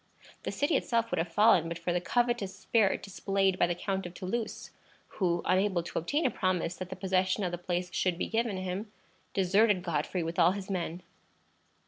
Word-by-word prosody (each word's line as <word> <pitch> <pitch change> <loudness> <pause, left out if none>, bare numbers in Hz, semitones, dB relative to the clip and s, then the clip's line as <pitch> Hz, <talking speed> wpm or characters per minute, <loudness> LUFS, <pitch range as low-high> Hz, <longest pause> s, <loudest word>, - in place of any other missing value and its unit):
The - - -3
city 290 +3 +1
itself 230 -1 0
would 180 - 0
have 165 +1 -2
fallen 185 -4 +5
but 165 0 -4
for 170 +1 -2
the 175 - 0
covetous 240 -2 0
spirit 220 -4 +1
displayed 195 -1 0
by - - +4
the 175 - -1
Count 190 +1 -2
of 175 - -12
Toulouse, 220 +5 -4 0.5
who, 175 -3 +1
unable 185 -1 +2
to - - -3
obtain 290 - 0
a 255 - +3
promise 180 -2 0
that 185 -1 -6
the - - -5
possession 190 +1 +1
of 180 - -1
the 175 - -4
place 180 +1 -3
should 180 -2 +1
be - - -1
given 225 -3 -1
him, 185 +3 -4 0.4
deserted 195 0 +3
Godfrey 170 +1 -1
with 165 +2 -3
all 175 +2 +6
his 195 0 -6
men. 175 -1 -3
185 Hz, 195 wpm, -30 LUFS, 175-205 Hz, 0.5 s, all